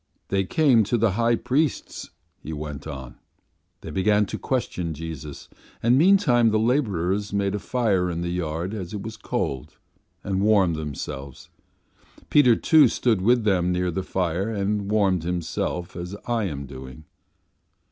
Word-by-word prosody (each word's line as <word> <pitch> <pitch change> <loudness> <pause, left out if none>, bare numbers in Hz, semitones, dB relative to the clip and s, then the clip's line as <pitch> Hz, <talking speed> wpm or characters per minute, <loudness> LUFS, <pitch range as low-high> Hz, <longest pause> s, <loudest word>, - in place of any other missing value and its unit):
"They 95 0 +1
came 130 -3 +4
to 120 - +1
the 115 -2 +2
high 115 +4 +2
priest's," 140 +5 -1 0.3
he 80 - -6
went 75 -1 -6
on; 65 -5 -8 0.6
"they - - -7
began 105 +2 +2
to - - -6
question 90 - -2
Jesus, 80 -2 -8 0.4
and 120 +2 +4
meantime 145 - +4
the 110 - +2
labourers 105 - 0
made 100 -1 0
a 105 - -2
fire 100 -7 0
in 85 -1 -3
the 85 0 -2
yard 85 +2 -3
as 95 -2 -5
it 100 - -5
was 110 0 -6
cold, 70 - -4 0.5
and 95 -1 -1
warmed 100 -5 +3
themselves. 70 -3 -7 0.8
Peter, 125 -6 +6
too, 155 +1 +5
stood 115 -4 +1
with 120 +4 +3
them 90 -4 +2
near 90 0 0
the 95 - -2
fire 95 +2 -1
and 100 -1 -1
warmed 100 -4 +2
himself 90 +1 -3
as 90 +2 -6
I 120 -3 0
am 70 -6 -4
doing. 65 +2 -10
95 Hz, 155 wpm, -24 LUFS, 85-115 Hz, 0.8 s, Peter